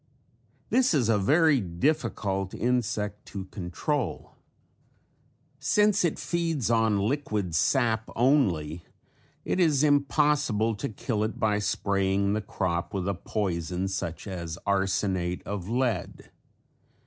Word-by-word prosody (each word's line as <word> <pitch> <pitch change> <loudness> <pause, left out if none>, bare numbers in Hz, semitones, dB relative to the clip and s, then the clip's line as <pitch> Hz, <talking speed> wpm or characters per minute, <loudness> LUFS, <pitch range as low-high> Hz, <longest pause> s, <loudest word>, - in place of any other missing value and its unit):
This 255 -9 +3
is 120 -6 +2
a 110 -2 +3
very 150 - +4
difficult 95 - -1
insect 105 -4 -1
to 95 -2 -6
control. 105 - -3 1.3
Since 205 +9 +3
it 170 - +1
feeds 165 -9 -1
on 115 -2 +3
liquid 105 - -1
sap 110 - +1
only 95 - +2 0.6
it - - 0
is 155 -5 +3
impossible 140 -6 +2
to 105 - -4
kill 110 0 -2
it 110 - -3
by 105 -1 +2
spraying 100 0 0
the 110 - 0
crop 85 -3 -2
with 95 -1 -2
a 100 - +1
poison 90 -2 -2
such 85 -4 -4
as 85 -4 -5
arsenate 95 -2 0
of 100 -1 -5
lead. 120 -7 -2
105 Hz, 115 wpm, -27 LUFS, 95-135 Hz, 1.3 s, very